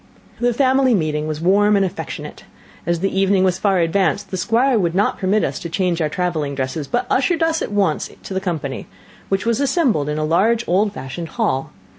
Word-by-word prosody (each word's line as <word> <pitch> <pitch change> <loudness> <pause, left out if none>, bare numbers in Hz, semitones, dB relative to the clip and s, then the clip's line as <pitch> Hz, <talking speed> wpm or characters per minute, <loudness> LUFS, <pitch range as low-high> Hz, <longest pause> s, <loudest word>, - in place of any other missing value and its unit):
The 245 0 +2
family 260 0 +3
meeting 155 -4 -1
was 155 0 -4
warm 205 +4 +4
and 195 -1 +3
affectionate; 180 - -6 0.4
as 170 -1 0
the 195 0 0
evening 195 -1 +3
was 185 -1 +1
far 195 -1 +2
advanced, 185 +3 0
the - - -2
Squire 235 +4 +2
would 170 -3 0
not 200 +2 +1
permit 200 +3 +1
us - - -2
to 170 - -6
change 175 0 0
our 155 - +1
travelling 155 -5 -2
dresses, 135 +2 -3
but 240 - -1
ushered 330 +5 +1
us 325 0 +1
at - - -3
once 195 -7 0
to - - -7
the 190 - -1
company, 155 -7 -4 0.4
which 195 +2 0
was 230 -1 +1
assembled 260 - +1
in 150 - -2
a 155 - 0
large 220 +9 +2
old 200 +4 +2
fashioned 160 0 -7
hall. 205 - 0
190 Hz, 205 wpm, -20 LUFS, 160-215 Hz, 0.4 s, warm